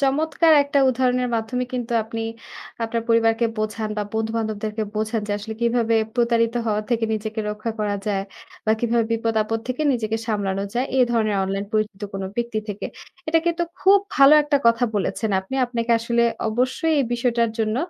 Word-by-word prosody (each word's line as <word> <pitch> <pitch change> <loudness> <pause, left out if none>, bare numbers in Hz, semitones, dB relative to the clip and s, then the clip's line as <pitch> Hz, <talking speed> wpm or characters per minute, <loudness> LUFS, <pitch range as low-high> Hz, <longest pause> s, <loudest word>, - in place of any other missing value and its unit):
চমৎকার 310 +4 +3
একটা 280 0 0
উদাহরণের 250 0 +1
মাধ্যমে 235 +3 -2
কিন্তু 245 -1 -3
আপনি 225 +1 -5 0.6
আপনার 230 0 -2
পরিবারকে 230 0 +3
বোঝান 215 0 -2
বা - - 0
বন্ধুবান্ধবদেরকে 220 -1 -2
বোঝান 220 +1 -1
যে 205 - 0
আসলে 220 +2 -6
কিভাবে 235 -1 +2 0.2
প্রতারিত 235 -1 +2
হওয়া 215 -1 0
থেকে 230 -1 +1
নিজেকে 220 +1 -4
রক্ষা 215 +2 -4
করা 205 -1 0
যায়, 195 -2 0 0.4
বা 220 - +4
কিভাবে 235 -1 +2
বিপদ-আপদ 225 -1 0
থেকে 255 +4 -2
নিজেকে 225 -3 -1
সামলানো 200 -3 -1
যায় 250 +3 0
এই 255 - +6
ধরনের 215 -3 +1
অনলাইন 195 +1 -2
পরিচিত 215 -1 -1
কোনো 195 -1 -4
ব্যক্তি 235 -2 -1
থেকে। 205 0 -4 0.4
এটা 325 +1 +4
কিন্তু 340 0 +1 0.2
খুব 395 +1 +6 0.2
ভালো 275 +1 +8
একটা 295 0 +1
কথা 230 +1 +4
বলেছেন 210 +2 -1
আপনি। 190 +7 -8
আপনাকে 235 -1 -3
আসলে 235 +1 +1 0.3
অবশ্যই 255 +8 0
এই - - +1
বিষয়টার 235 -1 +1
জন্য 220 0 0
230 Hz, 170 wpm, -22 LUFS, 215-245 Hz, 0.6 s, ভালো